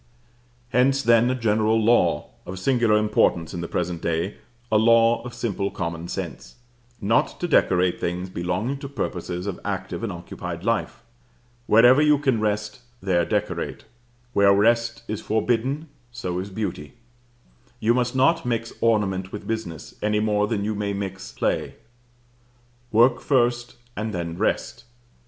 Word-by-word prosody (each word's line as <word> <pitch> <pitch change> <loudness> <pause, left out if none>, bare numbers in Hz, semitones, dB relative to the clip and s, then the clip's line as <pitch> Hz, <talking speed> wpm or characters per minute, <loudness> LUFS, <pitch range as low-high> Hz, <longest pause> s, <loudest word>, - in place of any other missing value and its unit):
Hence 135 +3 +2
then 115 0 +4
a 130 - +1
general 110 -1 +2
law, 105 -9 +2 0.2
of 95 - -6
singular 115 +1 +2
importance 105 -6 +1
in 85 - -4
the 85 - -4
present 85 -1 -2
day, 85 +4 -2 0.3
a 110 - +5
law 115 +1 +4
of 120 -1 -8
simple 100 -4 -2
common 85 -1 -4
sense, - - -6 0.4
not 110 +2 +1
to 175 - -1
decorate 90 - +2
things 90 +2 -2
belonging 95 +11 -2
to 140 - -7
purposes 90 -8 -4
of 100 -3 -4
active 95 -1 -4
and 115 -3 -3
occupied 85 -1 -7
life. - - -1 0.6
Wherever 120 +6 +6
you 150 -1 +5
can 135 -5 +1
rest, 105 0 -2 0.2
there 90 -4 +1
decorate; - - -2 0.5
where 100 -2 +5
rest 115 +2 +2
is 105 0 -4
forbidden, 125 +7 0 0.2
so 90 -7 -4
is 95 +2 -5
beauty. 95 -7 -5 0.9
You 115 +2 +3
must 125 0 0
not 165 +6 +3
mix 115 -1 -2
ornament 95 -4 +1
with 105 - -7
business, 110 -8 -5
any 105 0 +1
more 105 -1 +1
than 105 -2 -1
you 110 - -1
may 100 -1 -2
mix 95 -1 -5
play. - - -1 1.2
Work 120 +2 +4
first, 120 -3 +1 0.2
and 105 0 -3
then 85 -1 -3
rest. 110 +4 -2
105 Hz, 145 wpm, -24 LUFS, 95-120 Hz, 1.2 s, Wherever